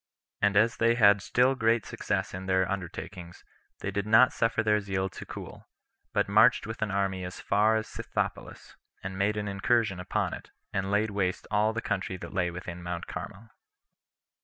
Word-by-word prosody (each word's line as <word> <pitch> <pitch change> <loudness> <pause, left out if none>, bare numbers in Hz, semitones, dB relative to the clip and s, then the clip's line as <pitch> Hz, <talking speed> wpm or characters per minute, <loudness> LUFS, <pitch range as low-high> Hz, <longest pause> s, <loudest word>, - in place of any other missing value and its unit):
And 100 0 +3
as 115 +2 +3
they 115 0 +3
had 100 -3 +5
still 125 +6 +3
great 115 -3 +1
success - - -2
in 95 +1 -6
their 95 0 +2
undertakings, 90 -2 -6 0.4
they 95 - -2
did 100 +1 -2
not 110 +4 +6
suffer 115 0 +1
their 105 -1 +2
zeal 95 -1 -2
to - - -10
cool, - - -9 0.4
but - - +1
marched 110 +5 +5
with 110 0 -7
an 110 - 0
army 95 -2 -1
as 90 0 -7
far 105 +2 +3
as 110 0 -1
Scythopolis, - - -5 0.3
and 95 0 -5
made 100 +2 0
an 105 0 -2
incursion 100 0 +1
upon 90 - -1
it, - - -9 0.2
and 95 0 -1
laid 105 +2 +1
waste 95 -3 -1
all 105 +1 +3
the 115 +1 -4
country 95 -2 -2
that - - -9
lay 90 -1 +1
within 90 0 -7
Mount 85 0 -4
Carmel. 100 +5 -8
100 Hz, 185 wpm, -28 LUFS, 95-110 Hz, 0.4 s, not